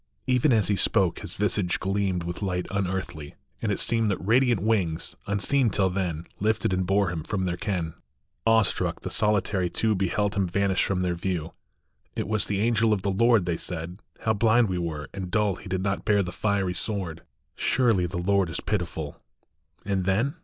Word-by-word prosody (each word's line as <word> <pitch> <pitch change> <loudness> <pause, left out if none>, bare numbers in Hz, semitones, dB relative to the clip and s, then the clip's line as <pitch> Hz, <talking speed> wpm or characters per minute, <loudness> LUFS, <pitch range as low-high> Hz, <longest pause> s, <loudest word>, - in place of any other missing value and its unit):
Even 130 +3 +3
as 110 -6 +3
he 105 - +2
spoke - - +1
his - - -5
visage 100 -3 0
gleamed 95 -2 0
With 85 +3 -5
light 90 -3 -1
unearthly, 95 -6 -3 0.3
and - - 0
it - - -1
seemed 115 -2 +1
That 100 - 0
radiant 120 +2 +3
wings, 95 -6 0
unseen 115 +6 +2
till 95 -2 +1
then, 90 -4 -2
Lifted 105 -2 +1
and 95 -1 0
bore 100 -1 +2
him 85 -2 -3
from 95 +2 -2
their 90 -1 -1
ken. 90 -5 -2 0.5
Awe 115 -1 +6
struck - - -1
the - - -5
solitary 100 -3 +2
two 110 +5 +1
Beheld 100 +2 0
him 100 -3 +1
vanish 100 +1 +1
from 95 -2 0
their 90 -1 0
view. 85 -2 -3 0.3
" - - -42
It - - -1
was 110 0 0
the 100 -1 -1
angel 115 -1 +3
of 100 -3 -2
the 100 - +1
Lord," 115 0 +4
They 85 -2 -1
said. 90 +3 -5
" - - -33
How 110 - +2
blind 110 +1 +3
we 90 -1 -1
were 80 -3 -4
and 95 -2 -5
dull 105 -1 +1
He 100 - -10
did 95 0 -1
not 100 0 -1
bear 105 -2 +3
the 90 - -5
fiery 100 -1 0
sword; 90 -5 -2 0.3
Surely 115 -9 +2
the 85 +1 -5
Lord 95 0 +2
is 80 - -3
pitiful." 85 -7 -3 0.6
And 95 -2 0
then 110 +9 +1
95 Hz, 200 wpm, -26 LUFS, 90-105 Hz, 0.6 s, Awe